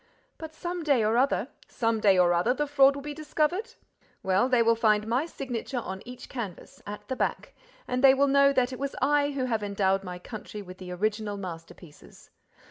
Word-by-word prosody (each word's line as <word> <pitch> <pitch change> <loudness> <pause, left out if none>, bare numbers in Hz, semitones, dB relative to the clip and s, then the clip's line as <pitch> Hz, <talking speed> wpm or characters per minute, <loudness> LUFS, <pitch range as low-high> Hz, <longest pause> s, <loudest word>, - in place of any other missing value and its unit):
"But 320 -1 -8
some 350 +1 -4
day 280 -7 +2
or 220 +2 +2
other—" 260 +3 +1 0.2
"Some 225 -2 -1
day 200 -3 +4
or 175 -1 +4
other, 200 +9 +2
the 295 - 0
fraud 275 -1 +4
will 280 - -7
be 295 0 -5
discovered? 310 +9 -2 0.5
Well, 190 +7 +2
they 245 -2 +4
will 230 0 +4
find 215 -2 +2
my 250 +8 0
signature 260 -4 -5
on 190 -5 -5
each 250 0 -10
canvas—at 210 -2 -8
the 260 - -3
back—and - - -4
they 270 -1 +8
will 280 +1 +3
know 280 0 +5
that 260 -1 +1
it 255 - -7
was 280 0 -3
I 290 0 +2
who 265 -2 -1
have 225 -4 -1
endowed 195 -1 0
my 180 -1 -6
country 210 +2 -8
with 185 0 -12
the 180 -1 -8
original 210 +2 -2
masterpieces. 165 -3 -11
240 Hz, 195 wpm, -27 LUFS, 205-280 Hz, 0.5 s, they